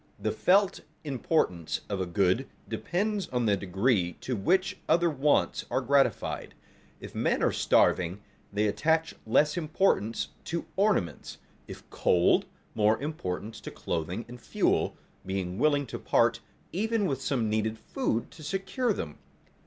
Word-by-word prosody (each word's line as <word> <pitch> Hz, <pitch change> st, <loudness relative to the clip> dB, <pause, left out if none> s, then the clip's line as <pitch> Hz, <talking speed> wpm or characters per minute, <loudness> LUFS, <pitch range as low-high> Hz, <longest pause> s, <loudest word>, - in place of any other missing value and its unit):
The -, -, -1 dB
felt 195 Hz, +1 st, +3 dB, 0.2 s
importance 130 Hz, -, 0 dB
of 100 Hz, -2 st, -2 dB
a 95 Hz, -, -2 dB
good 95 Hz, +8 st, +1 dB, 0.2 s
depends 200 Hz, +1 st, -1 dB
on 125 Hz, -2 st, -1 dB
the 105 Hz, -2 st, +4 dB
degree 95 Hz, 0 st, +1 dB
to 130 Hz, -, -2 dB
which 185 Hz, -, +1 dB
other 170 Hz, 0 st, +4 dB
wants 145 Hz, 0 st, +2 dB
are -, -, +1 dB
gratified. 135 Hz, +2 st, +1 dB, 0.4 s
If -, -, -9 dB
men -, -, +1 dB
are -, -, +3 dB
starving, 90 Hz, +2 st, +2 dB, 0.3 s
they 105 Hz, +1 st, +1 dB
attach 160 Hz, +9 st, +1 dB
less 150 Hz, +8 st, +3 dB
importance 155 Hz, -, +1 dB, 0.2 s
to 170 Hz, 0 st, -3 dB
ornaments; 190 Hz, -, 0 dB, 0.3 s
if -, -, -10 dB
cold, 90 Hz, -1 st, +3 dB, 0.3 s
more 105 Hz, +1 st, +3 dB
importance 110 Hz, -, -4 dB
to -, -, -6 dB
clothing 90 Hz, +6 st, -3 dB
and 120 Hz, 0 st, -11 dB
fuel, -, -, +1 dB, 0.3 s
being 95 Hz, 0 st, -3 dB
willing 145 Hz, 0 st, +3 dB
to -, -, -6 dB
part -, -, +2 dB, 0.3 s
even 220 Hz, +2 st, 0 dB
with 135 Hz, -7 st, -1 dB
some 135 Hz, -5 st, 0 dB
needed 110 Hz, +1 st, 0 dB
food 115 Hz, -, -2 dB
to 165 Hz, -, -13 dB
secure 195 Hz, -, -1 dB
them. 75 Hz, -, -6 dB
125 Hz, 140 wpm, -28 LUFS, 100-165 Hz, 0.4 s, the